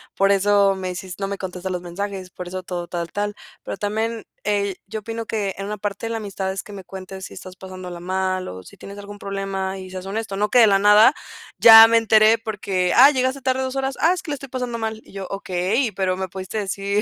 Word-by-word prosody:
por 195 0 +3
eso 200 0 +3
me 185 -1 -4
hicis 180 0 -7
no 195 - -2
me 200 0 -4
contestas 185 0 -5
los 180 -1 -3
mensajes, 185 +1 -5
por 180 -1 -8
eso 185 +1 -5
todo 175 -1 -5
tal 170 -1 -4
tal". 205 0 -2 0.3
Pero - - -5
también, 220 +3 -2 0.2
eh, 200 -2 0
yo 220 +2 -5
opino 225 +1 -5
que 205 -3 -2
en 195 - -5
una 210 +1 -4
parte 205 +2 -4
la 230 - -2
amistad 195 -3 -4
es 195 - -4
que - - -12
me 195 -1 -8
cuentes 190 +1 -9
si - - -10
estás 185 0 -10
pasándola 185 -2 -8
mal, 185 +1 -2
o 95 0 -8
si - - -15
tienes 200 +1 -10
algún 205 0 -9
problema 195 -1 -3
y 185 0 -9
seas 185 0 -7
honesto, 205 +1 -4
no 210 +1 +1
que 250 - +4
de 225 - +8
la 200 -1 +4
nada, 210 +5 +7 0.5
ya 225 -1 +11
me 230 0 +4
enteré 220 0 +5
porque: 195 -5 -1
"Ah, 270 +4 +9
llegaste 260 0 -1
tarde 260 +1 0
2, 260 0 -4
horas". 270 0 -2
"Ah, 335 +3 +5
es 365 - -4
que 310 - -6
le - - -1
estoy 275 -1 -10
pasando 250 -2 -3
mal". 220 -1 -4
Y - - -18
yo: 195 -1 -5
"Okey, 195 +5 -1
pero 185 -1 -1
me 190 0 -3
pudiste 190 +4 -5
decir 200 +1 -1
200 Hz, 245 wpm, -22 LUFS, 190-220 Hz, 0.5 s, ya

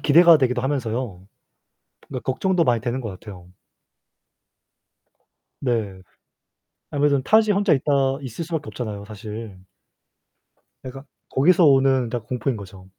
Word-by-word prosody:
기대가 165 +2 +6
되기도 125 -2 0
하면서요 120 -8 -3 0.8
그러니까 130 -3 -6
걱정도 175 +6 +1
많이 120 -5 +1
되는 125 +2 -3
것 115 - -5
같아요. 95 -2 -11 2.1
네. 110 -7 -2 0.9
아무래도 145 -1 +1
타지에 215 +6 +3
혼자 200 -3 +2
있다 135 -1 +1
있을 130 +4 -6
수 170 - -12
밖에 150 -2 -3
없잖아요 105 -4 -6
사실. 105 -1 -9 1.2
그러니까 135 +1 -9 0.3
거기서 175 +7 +4
오는 135 -3 +4
다 120 0 -3
공포인 125 +2 -3
거죠. 95 -2 -11
130 Hz, 290 characters per minute, -22 LUFS, 110-145 Hz, 2.1 s, 기대가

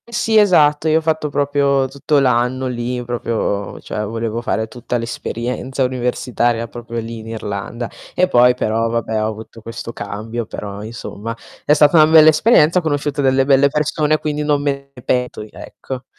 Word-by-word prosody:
Sì, 235 -1 -1
esatto, 155 -7 +4
io 155 0 +4
ho - - +1
fatto 155 -1 -1
proprio 140 -1 +1
tutto 140 +2 -1
l'anno 125 0 +1
lì, 125 0 -3
proprio 115 -4 -2
cioè 105 - -4
volevo 115 +1 -3
fare 110 -1 -1
tutta 120 +1 -4
l'esperienza 120 +3 -3
universitaria 120 -2 -1
proprio 115 0 -6
lì 115 0 -6
in 110 - -10
Irlanda, 115 +1 -5 0.3
e 185 - +3
poi 125 -6 +5
però 115 -1 0
vabbè, 110 -1 -1
ho - - 0
avuto 110 +1 -8
questo 115 +1 -7
cambio 110 +3 -5
però, 100 0 -7
insomma, 115 0 -7 0.3
è 150 - +5
stata 150 +2 +5
una 155 +1 +4
bella 155 -1 +8
esperienza, 160 0 +4
ho - - -4
conosciuto 145 -2 -1
delle 135 0 +3
belle 135 0 +5
persone 150 +1 +1
quindi 150 -1 -3
non 145 -1 +1
me 140 -1 -2
ne 125 -3 -14
pento 125 -2 -1
di 105 - -9
ecco. 130 -1 -8
125 Hz, 175 wpm, -18 LUFS, 115-145 Hz, 0.3 s, bella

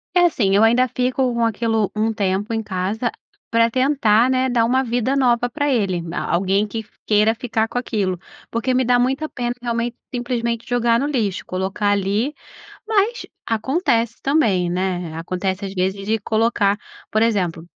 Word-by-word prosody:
Eh, - - +6
assim, 210 - +2
eu 210 - +5
ainda 245 +3 +4
fico 250 +1 0
com 235 0 0
aquilo 225 -1 0
um 220 +1 +1
tempo 200 +2 -1
em 225 - 0
casa 205 +4 -2 0.4
pra 230 0 +3
tentar, 255 -3 +3
né, 260 0 +2
dar 245 -2 +2
uma 260 +3 +2
vida 245 +2 0
nova 245 -2 +2
pra 290 +1 -1
ele, 195 -8 0
na 170 +1 -4
alguém 195 +3 +1
que 220 0 -5 0.2
queira 210 +1 +4
ficar 225 -2 -1
com 245 +2 -2
aquilo. 195 -7 -2 0.3
Porque 235 +3 0
me 255 -1 +2
dá 245 0 +3
muita 270 +5 0
pena, 240 -3 -3
realmente, 235 0 -2 0.2
simplesmente 235 -2 -2
jogar 235 -1 +2
no 285 - 0
lixo, 220 -10 -1
colocar 190 +3 -1
ali 205 +7 +1 0.6
mas 440 +3 +1 0.2
acontece 235 - 0
também, 220 - +2
né? 180 -2 -2
Acontece, 185 +4 -3
às 195 - -6
vezes, 190 +2 -1
de 225 - +2
colocar 215 -1 +1 0.4
por 215 - +2
exemplo, 185 -8 0
230 Hz, 170 wpm, -21 LUFS, 200-245 Hz, 0.6 s, Eh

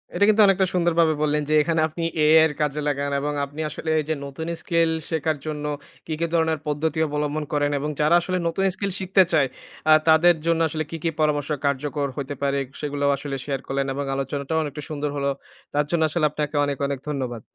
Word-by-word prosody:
এটা 205 - +4
কিন্তু 215 0 +5
অনেকটা 195 -1 +3
সুন্দরভাবে 170 -2 +3
বললেন 150 0 +1
যে - - +2
এখানে 165 +1 +1
আপনি 165 +2 -6 0.2
AI 155 +1 +6
এর 160 - 0
কাজে 150 0 0
লাগান 140 0 -1
এবং 145 +1 -2
আপনি 145 +3 -12
আসলে 160 - -5
এই 155 - +1
যে - - +2
নতুন 140 +4 -6
স্কিল 165 -2 +2 0.2
শেখার 160 -1 0
জন্য 150 -1 -4 0.4
কি, 160 - -4
কি, 170 - +1
ধরনের 160 -2 +2
পদ্ধতি 155 +2 -1
অবলম্বন 150 +1 -2
করেন 145 0 +1
এবং 150 +2 -2
যারা 155 +3 +4
আসলে 185 +1 -2
নতুন 195 +4 0
স্কিল 200 0 -2
শিখতে 190 0 +4
চায় 145 -4 +4 0.4
আ - - +10
তাদের 165 +2 +6
জন্য 165 0 +2
আসলে 155 0 -3
কী, 165 - -4
কী, 165 - +2
পরামর্শ 145 -1 +1 0.2
কার্যকর 140 +1 -1
হইতে 140 0 -4
পারে 140 0 +1 0.2
সেগুলোও 145 -1 0
আসলে 140 0 -5
শেয়ার 135 -2 -2
করলেন 135 0 -1
এবং 140 +1 -3
আলোচনাটাও 140 +3 -2
অনেকটা 150 0 -6
সুন্দর 150 -1 -2
হল। 140 - -2 0.5
তার 145 +1 +2
জন্য 170 -2 +1
আসলে 160 0 +1
আপনাকে 150 0 -3
অনেক, 140 -1 -2
অনেক, 140 -2 -3
ধন্যবাদ। 125 -5 -3
150 Hz, 205 wpm, -23 LUFS, 145-165 Hz, 0.5 s, আ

